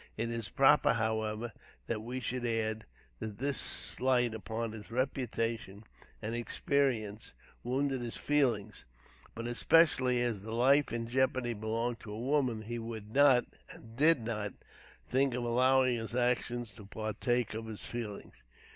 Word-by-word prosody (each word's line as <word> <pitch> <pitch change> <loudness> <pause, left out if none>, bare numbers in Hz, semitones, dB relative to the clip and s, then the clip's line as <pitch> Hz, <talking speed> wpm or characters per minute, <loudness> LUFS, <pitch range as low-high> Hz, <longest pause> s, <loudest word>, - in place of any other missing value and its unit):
It 115 +1 -1
is 115 -4 -3
proper, - - +5
however, 110 0 -1 0.3
that 110 -2 -2
we 125 +3 -4
should 125 0 -3
add, 110 -2 -1 0.3
that 105 -2 -6
this 140 +2 0
slight 125 -2 +2
upon 110 +2 -4
his 110 -1 -9
reputation 115 -5 -2 0.4
and 110 +2 -3
experience 120 - -1 0.3
wounded 135 +1 0
his 120 -1 -4
feelings. 120 - 0 0.5
But, 115 - -5
especially, 130 0 +4
as 115 -5 -1
the 110 +2 -6
life 135 +5 +4
in 115 0 -3
jeopardy 130 -1 +1
belonged 115 +2 -2
to 105 - -10
a 105 - -6
woman, 125 -4 0
he 120 +2 -4
would 110 -2 -7
not, 135 -3 +6 0.2
and 115 0 -12
did 155 +1 +4
not, 105 -3 -3 0.5
think 135 -1 +2
of 125 - -2
allowing 130 +1 +3
his 115 +1 -5
actions 120 -2 0
to 100 +1 -13
partake 110 +3 -1
of 110 +1 -5
his 110 -2 -5
feelings. 115 -4 -6
115 Hz, 145 wpm, -32 LUFS, 110-125 Hz, 0.5 s, not